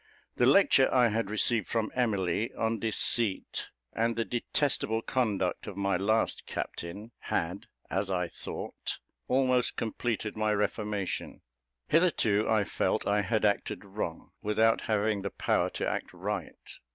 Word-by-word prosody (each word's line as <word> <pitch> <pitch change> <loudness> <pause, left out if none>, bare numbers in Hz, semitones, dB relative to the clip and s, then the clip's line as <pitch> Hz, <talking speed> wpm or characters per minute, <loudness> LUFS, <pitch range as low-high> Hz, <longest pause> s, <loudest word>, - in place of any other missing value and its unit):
The 120 - +4
lecture 135 -3 +5
I 125 -2 +5
had 110 -1 -1
received 110 0 +1
from 115 -2 -1
Emily 110 -3 0
on 115 0 0
deceit, 110 -1 -1 0.2
and 115 +1 +1
the 115 - 0
detestable 120 -2 0
conduct 105 -8 0
of 100 - -6
my 100 -1 +1
last 110 +5 +1
captain, 100 +7 -5
had, 90 +4 -2 0.2
as 95 +2 -1
I 90 -2 0
thought, - - -6 0.3
almost 130 -1 +2
completed 110 -1 -2
my 110 0 +1
reformation. 105 -1 -2 0.5
Hitherto 145 - +3
I 110 -2 +4
felt - - 0
I 105 0 +2
had 110 +1 +1
acted 100 0 0
wrong, 95 -4 -5
without 110 +2 +3
having 105 -1 +1
the 100 - -2
power - - +1
to - - -3
act - - -2
right. 95 0 -5
110 Hz, 140 wpm, -30 LUFS, 100-115 Hz, 0.5 s, lecture